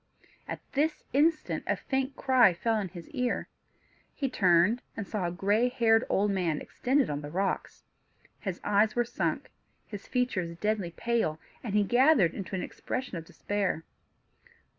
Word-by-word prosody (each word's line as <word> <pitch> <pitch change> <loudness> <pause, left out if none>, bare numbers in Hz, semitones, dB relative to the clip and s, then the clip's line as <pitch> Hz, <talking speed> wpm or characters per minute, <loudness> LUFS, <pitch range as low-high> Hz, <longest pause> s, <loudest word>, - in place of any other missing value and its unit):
At - - -5
this 300 +3 0
instant 310 +3 +2
a - - +2
faint 265 0 -2
cry 250 -10 +4
fell 225 +6 0
on 210 -3 0
his 175 -1 -10
ear. 250 -4 -1 0.7
He 270 -3 -2
turned, 185 +3 +4 0.2
and 205 -4 -4
saw 200 -5 -2
a - - -3
gray 205 +7 +2
haired 225 -2 +3
old 205 +1 +2
man 175 -6 0
extended 265 +2 0
on 145 0 -3
the 145 - -7
rocks. 190 +4 -2 0.6
His 190 -3 -4
eyes 210 +1 +3
were 240 0 +2
sunk, 240 - -2 0.3
his 205 -2 -9
features 185 -10 -1
deadly 210 -2 0
pale, 195 -5 -1 0.2
and 205 -3 +1
gathered 245 - +5
into 195 0 -5
an 185 - -2
expression 255 -6 -4
of 165 -1 -6
despair. 200 -3 -2
210 Hz, 155 wpm, -29 LUFS, 185-250 Hz, 0.7 s, gathered